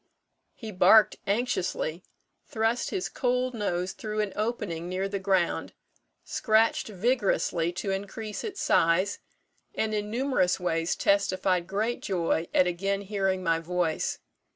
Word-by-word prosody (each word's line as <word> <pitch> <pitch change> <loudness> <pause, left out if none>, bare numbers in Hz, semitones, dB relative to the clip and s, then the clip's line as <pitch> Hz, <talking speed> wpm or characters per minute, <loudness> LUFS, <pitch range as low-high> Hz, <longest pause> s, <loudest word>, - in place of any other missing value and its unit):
He 220 -3 -7
barked 195 +2 +5
anxiously, 190 -6 -1 0.5
thrust 225 +2 0
his 380 -2 -2
cold 250 0 0
nose 185 -4 -2
through 215 +1 -3
an 210 -2 -3
opening 205 -6 -3
near 185 +2 -1
the 200 0 -3
ground, 190 -3 0 0.5
scratched 220 0 +2
vigorously 200 -5 0
to 195 +2 -3
increase 205 +2 -5
its 405 -3 -4
size, 185 +5 +2 0.6
and 220 0 -1
in 210 0 -2
numerous 235 -7 +1
ways 165 -1 0
testified 185 -3 +1
great 215 +5 -1
joy 170 -3 0
at 185 - +4
again 195 +3 -1
hearing 195 -2 -1
my 165 -2 +2
voice. 170 -1 -1
195 Hz, 130 wpm, -27 LUFS, 180-220 Hz, 0.6 s, barked